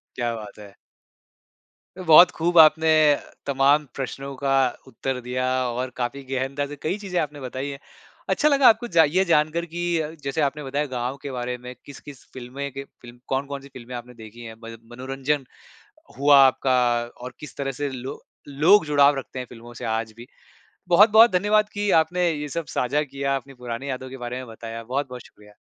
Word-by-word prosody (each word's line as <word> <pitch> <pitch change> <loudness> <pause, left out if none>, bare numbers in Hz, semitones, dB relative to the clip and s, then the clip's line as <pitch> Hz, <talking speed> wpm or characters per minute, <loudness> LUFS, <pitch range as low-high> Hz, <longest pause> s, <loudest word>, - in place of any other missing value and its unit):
क्या 120 -1 -2
बात 105 -1 -10
है! 100 -1 -12 1.2
बहुत 175 0 +7
खूब 170 +1 -1
आपने 160 +1 +6 0.6
तमाम 140 +2 +3
प्रश्नों 135 +1 -5
का 140 -1 -1 0.4
उत्तर 130 +3 -4
दिया 125 +1 -3 0.2
और 125 +2 -3
काफ़ी 130 +3 -3
गहनता 135 +2 -3
से 145 - -8
कई 185 +6 -2
चीज़ें 190 -4 -3
आपने 150 -1 -5
बताई 130 +2 -5
है। 140 - -7 0.5
अच्छा 300 - +3
लगा 280 -2 +5
आपको 240 +2 +1
जा 165 -4 +5
ये 175 +6 +2
जानकर 165 0 +1
कि 170 +1 -8 0.4
जैसे 140 +3 -2
आपने 145 +1 -1
बताया 140 +2 -2
गाँव 125 +1 -4
के 140 - -6
बारे 125 0 -4
में 125 +1 -9
किस-किस 140 -1 -12
फ़िल्में 130 +3 -6
के 135 +1 -7
फ़िल्म 120 -2 -16
कौन-कौन 140 +1 -3
सी 140 - -13
फ़िल्म 125 0 -10
आपने 120 +1 -9
देखी 115 0 -13
हैं 110 0 -9
म 115 0 -8 0.2
मनोरंजन 135 +3 -3 0.7
हुआ 145 0 +6
आपका 130 0 +1 0.4
और 125 0 -8
किस 150 - -10
तरह 135 -1 -3
से 145 +3 -3
लो 130 0 -7 0.3
लोग 160 +8 +4
जुड़ाव 145 -1 +4
रखते 130 - -7
हैं 125 - -5
फ़िल्मों 120 0 -12
से - - -8
आज 110 0 -2
भी। 120 +1 -11 0.6
बहुत-बहुत 215 +5 +7
धन्यवाद 210 +3 +2
कि 205 0 -1
आपने 175 +2 0
ये 150 -1 -4
सब 170 +2 -4
साझा 140 +4 0
किया, 140 -1 -3
आपने 135 +1 -7
पुरानी 125 +1 -6
यादों 130 0 -5
के 135 - -9
बारे 120 0 -5
में 130 -1 -7
बताया। 115 0 -8
बहुत-बहुत 125 0 -4
शुक्रिया। 105 0 -19
135 Hz, 180 wpm, -23 LUFS, 125-150 Hz, 1.2 s, बहुत